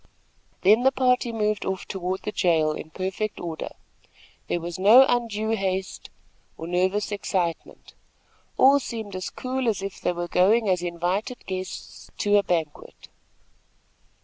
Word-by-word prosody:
Then 210 +5 +5
the 265 +1 +4
party 250 -2 +1
moved 215 -2 -1
off 190 -1 -4
toward 185 -1 -3
the 210 - -3
jail 160 -6 +2
in 155 - -7
perfect 190 +5 -4
order. 165 -2 -5 0.8
There 175 - -1
was 170 +1 -6
no 225 +8 +8
undue 225 -3 0
haste, 190 -3 -2 0.5
or 165 - -7
nervous 185 +5 0
excitement. 185 -4 -3 0.6
All 275 +2 +6
seemed 220 -6 -6
as 185 - -4
cool 260 0 -3
as 205 -3 -2
if 195 -1 -6
they - - 0
were 175 0 -4
going 210 +6 +3
as 180 -2 +2
invited 180 +7 -3
guests 185 -1 -7
to 205 0 +3
a - - +5
banquet. 165 -6 -4
195 Hz, 145 wpm, -25 LUFS, 180-220 Hz, 0.8 s, no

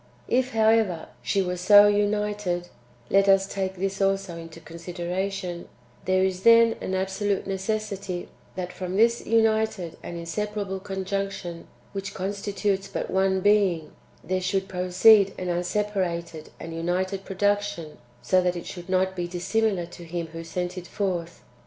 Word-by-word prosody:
If, 255 0 +1
however, 220 -6 +2
she 195 - +1
was 180 -1 -3
so 205 +2 +8
united 205 -3 0 0.4
(let 195 0 +5
us 195 0 +5
take 190 -1 -3
this 195 +1 -2
also 195 -2 +1
into 165 0 -9
consideration), 175 +2 -4 0.4
there 185 0 +3
is 190 -1 0
then 230 +1 +6
an 190 - -2
absolute 195 +1 -1
neces 195 +3 -1
sity, 190 -3 -5 0.3
that 180 -1 -4
from 185 0 -4
this 230 +3 +3
united 220 -5 +1
and 175 - -6
inseparable 200 +3 -3
conjunction, 190 -2 -4 0.2
which 195 -1 -5
constitutes 200 0 -2
but - - -4
one 190 0 +2
being, 195 -6 +2 0.4
there^ 185 0 0
should 190 +1 -1
proceed 190 +3 +5
an 180 - -3
unsepa 205 +4 -1
rated 170 -3 -3
and 165 - -7
united 185 +4 -1
production, 205 -4 -1 0.2
so 185 +9 +3
that 180 0 0
it 175 - -6
should 175 0 -8
not 190 0 +1
be 175 -1 -2
dis 175 0 -6
similar 215 -5 +1
to 175 0 -12
Him 170 0 -4
who 165 0 -6
sent 180 +2 -4
it 175 - -11
forth. 175 -4 -3
190 Hz, 150 wpm, -25 LUFS, 175-205 Hz, 0.4 s, so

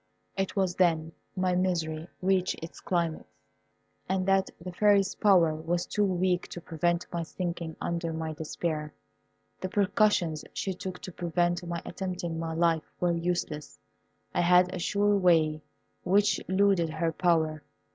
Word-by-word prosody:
It 195 -1 -2
was 190 -3 +1
then 165 -3 +2 0.2
my 185 -1 +1
misery 170 -3 -1 0.2
reached 185 -1 +2
its 165 - -8
climax, 170 -3 -1 0.9
and 190 0 0
that 195 0 +3
the 180 +2 -7
Fairy's 200 +1 +3
power 180 -6 +4
was 165 +3 -2
too 210 - 0
weak 185 -2 +1
to - - -7
prevent 170 +1 -1
my 170 - -1
sinking 170 -1 -4
under 170 -1 -2
my 160 0 -3
despair. 155 -1 -4 0.6
The 185 - -3
precautions 200 -5 +2
she 190 - -2
took 185 0 -6
to 185 - -6
prevent 175 +1 0
my 170 0 -4
attempting 175 -3 -4
my 165 -1 -3
life 165 -1 +1
were 175 -1 +2
useless. 170 - -3 0.6
I - - +2
had 180 +1 +5
a 185 - -3
sure 205 +3 +2
way 160 -5 +3 0.4
which 200 +3 +3
eluded 190 -3 +3
her 160 +1 -1
power. 160 -3 +1
175 Hz, 145 wpm, -28 LUFS, 165-185 Hz, 0.9 s, had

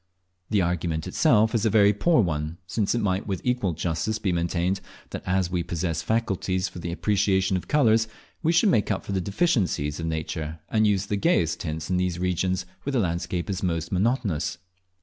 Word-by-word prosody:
The 105 -3 +2
argument 85 -2 -1
itself 110 +1 +3
is 115 -3 +1
a 110 - +3
very 105 -1 +5
poor 155 - +3
one, 75 -1 -2
since 105 +4 0
it 120 - 0
might 95 -1 0
with 95 -3 -2
equal 125 -8 0
justice 85 +7 -1
be 105 -4 -1
maintained, 85 +2 0 0.3
that - - -5
as 90 -1 +1
we 90 -1 0
possess 85 -1 -2
faculties 95 -4 0
for 90 - -9
the 85 0 -4
appreciation 95 0 +1
of 90 - -3
colours, 115 -7 +3 0.3
we 165 -1 +2
should 175 +5 +4
make 110 - +2
up 100 -3 -1
for - - -5
the 95 -1 0
deficiencies 95 - 0
of 80 - -3
nature 80 0 -3
and 110 -1 +3
use 100 -1 +1
the 100 0 -1
gayest 100 - +2
tints 80 +1 -4
in 90 - +2
those 90 -1 0
regions 90 0 0 0.2
where 140 - -3
the - - +2
landscape 85 -2 -1
is 95 -3 -3
most 85 -3 -2
monotonous. 95 - 0
95 Hz, 195 wpm, -25 LUFS, 85-105 Hz, 0.3 s, very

